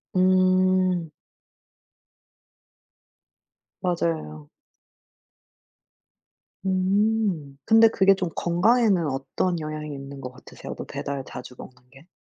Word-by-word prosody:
음. 185 -1 +3 2.7
맞아요. 160 - -2 2.2
음. 190 -5 0
근데 225 +1 +7
그게 195 -3 +4
좀 185 -3 -3
건강에는 190 0 +2
어떤 145 +6 -2
영향이 155 -1 -5
있는 140 0 -9
거 125 - -6
같으세요? 125 - -10
또 - - -6
배달 140 -1 -5
자주 125 0 -9
먹는 130 - -11
게? 135 +5 -18
175 Hz, 165 characters per minute, -24 LUFS, 140-185 Hz, 2.7 s, 근데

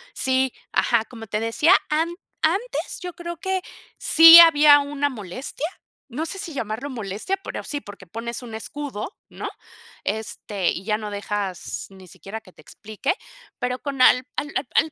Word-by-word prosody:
Sí, 260 -1 +1 0.2
ajá, 230 -2 +2
como 225 -2 -11
te 210 +1 -2
decía, 230 - +4
an 315 +2 +1 0.3
antes 390 +10 -1
yo 360 -1 -6
creo 345 0 -7
que 380 +1 -2 0.4
sí 330 +1 +10
había 300 -3 +8
una 285 0 -1
molestia, 250 - -6 0.4
no 285 +5 -4
sé 390 +4 -5
si 345 -5 -5
llamarlo 230 +3 -4
molestia, 225 - -3
pero - - -6
sí, 290 -1 -4
porque 200 -5 -12
pones 235 +5 -5
un 235 -3 -8
escudo, 275 - -6
¿no? - - -6 0.6
Este, 205 -3 -2
y 180 - -5
ya 210 0 +1
no 210 -1 -6
dejas 200 -2 -4
ni 190 -1 -15
siquiera 205 +5 -9
que 185 - -18
te - - -17
explique, 215 - -3 0.5
pero 250 0 -1
con 275 -3 -4
al 250 0 +6
al 290 - -2 0.2
al 320 - +3
255 Hz, 165 wpm, -23 LUFS, 215-305 Hz, 0.6 s, sí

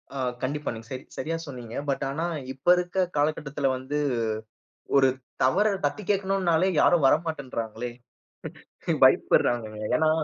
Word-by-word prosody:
ஆ - - -3 0.2
கண்டிப்பா. 150 +3 -2
நீங்க 115 0 -10
சரி 130 +1 -5
சரியா 165 +1 -2
சொன்னீங்க. 120 -4 -8
பட் 135 - 0
ஆனா, 150 +4 -2 0.3
இப்ப 135 +5 -20
இருக்க 180 +1 0
காலகட்டத்தில 145 -2 0
வந்து, 140 +3 -3 1.0
ஒரு 135 -1 +6 0.3
தவற 190 +12 +3 0.2
தட்டி 175 +9 -1
கேட்கணுன்னாலே 190 -3 +2
யாரும் 170 -5 +4
வரமாட்டேன்றாங்களே. 125 -7 -1 1.1
பயப்படுறாங்க 120 -2 +4 0.3
ஏன்னா, 155 +4 +3
145 Hz, 115 wpm, -26 LUFS, 130-170 Hz, 1.1 s, ஒரு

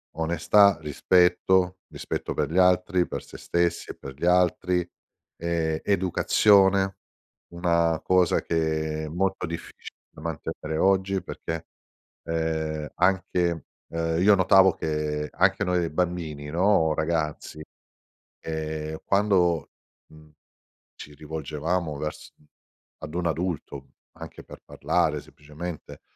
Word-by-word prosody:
onestà, 85 +4 +3
rispetto, 90 +4 +2
rispetto - - -4
per - - -1
gli 85 - -1
altri, 90 0 +3
per - - -5
sé - - -12
stessi 85 0 -1
e - - -11
per 70 - -9
gli 75 - -4
altri, 90 0 +2 0.5
ehm, 80 -2 -1
educazione, 95 0 +3 0.6
una 85 -2 +1
cosa 90 -2 +3
che 80 -1 -1
è - - -6
molto 95 +5 -1
difficile 85 0 -9
da - - -15
mantenere 80 -1 -5
oggi, 95 0 +2
perché, 80 -1 -6 0.6
ehm, 80 -2 -2
anche 90 -2 +1 0.2
ehm, 80 0 -1
io 105 +1 +6
notavo 95 -1 +5
che 75 -1 -3
anche - - +2
noi, 90 -2 +1
ehm, 80 - -5
bambini, 85 -4 -2
no, 85 -1 +3
ragazzi, 75 -1 -2 0.8
ehm, 80 -1 -4
quando, 95 -6 +2 0.4
mhmm, 75 0 -18 0.6
ci 75 - -11
rivolgevamo 80 +2 -3
vers 75 +1 -6
mhmm, 75 - -27 0.6
ad 75 - -7
un 85 -1 0
adulto 80 -4 -4 0.3
anche - - -10
per - - -12
parlare - - 0
semplicemente, 75 +3 -9
85 Hz, 115 wpm, -25 LUFS, 80-90 Hz, 0.8 s, io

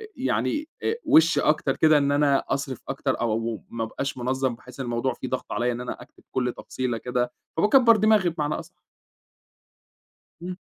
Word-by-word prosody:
يعني 305 +1 -1
أ - - +1
وِش 160 +2 +5
أكتر 150 -3 +1
كده 155 -1 +5
إن 140 -1 +2
أنا 145 -1 +3
أصرف 135 -4 -2
أكتر 135 0 -1
أو 120 -2 +1
و 115 0 -2
ما 115 -1 -3
أبقاش 135 +5 -4
مُنظَّم، 130 0 -1
بحيث 125 +2 -15
إن 135 - -3
الموضوع 120 +2 -1
فيه - - -7
ضغط 130 0 -4
عليّا 120 +3 0
إن 120 0 -4
أنا 125 - -6
أكتب - - -17
كل 125 -2 -1
تفصيلة 125 -3 -3
كده، 125 +1 -2 0.3
فباكبّر 230 +5 +6
دماغي 210 -3 +4
بمعنى 150 -2 -2
أص 165 0 -8 1.7
امم 180 +1 -5
135 Hz, 175 wpm, -25 LUFS, 125-160 Hz, 1.7 s, فباكبّر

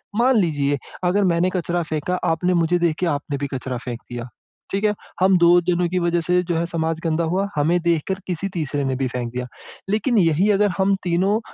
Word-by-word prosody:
मान 245 +1 +3
लीजिए, 145 -6 +1 0.3
अगर 195 +3 +2
मैंने 175 +2 +2
कचरा 175 -1 -1
फेंका, 155 +3 -2
आपने 180 +3 +1
मुझे 170 +1 +2
देख 170 -2 +1
के 180 - +1
आपने 145 -2 -2
भी 140 - -3
कचरा 130 -1 -3
फेंक 120 -1 -6
दिया। 120 0 -6 0.4
ठीक 200 +2 -1
है? 210 -1 +3 0.3
हम 190 -1 +5
2 175 +1 +6
जनों 175 0 +2
की 180 0 0
वज़ह 170 0 +1
से 180 +2 +2
जो 170 -1 -2
है 170 - 0
समाज 165 -1 -2
गंदा 165 0 0
हुआ, 185 +5 0
हमें 165 +4 +2
देखकर 170 +3 0
किसी 185 +2 -2
तीसरे 145 -4 -2
ने 135 -1 -1
भी 130 0 -1
फेंक 120 -1 -4
दिया। 125 0 -4 0.4
लेकिन 220 +3 +1
यही 175 +3 +3
अगर 205 +1 +3
हम 195 +1 +3
तीनों 185 +5 +1
170 Hz, 215 wpm, -22 LUFS, 150-185 Hz, 0.4 s, 2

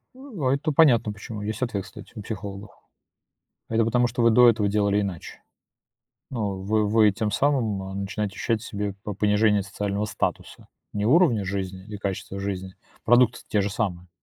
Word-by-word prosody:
Э, - - -17
а 200 - -2
это 150 +3 -1
понятно 120 -8 +4
почему. 105 +1 -8
Есть 110 +3 -4
ответ, 110 -6 -1
кстати, - - -12
у - - -6
психологов. 100 -1 -7 1.0
Это 115 0 +2
потому, 120 +1 +2
что 120 +1 -3
вы 115 - +5
до 120 +1 +7
этого 105 -3 +1
делали 100 0 +2
иначе. 95 -4 -6 0.9
Но 105 -6 -2
вы 105 +2 0
вы 110 -1 +5
тем 105 +1 -2
самым, 115 -6 +1
а, 95 0 -7
начинаете 100 +1 -3
ощущать 115 +1 -1
в - - -9
себе 100 -1 -3
по 105 - -5
понижение 105 0 +2
социального 100 +1 -3
статуса. - - -4 0.3
Не 105 0 -1
уровня 130 - +4
жизни 95 -1 -4
и 105 - -6
качества 100 0 -4
жизни. 95 -1 -4 0.3
Продукты-то 120 0 +4
те 105 - +1
же 100 - -1
самые. 90 -4 -3
105 Hz, 175 wpm, -25 LUFS, 100-115 Hz, 1.0 s, до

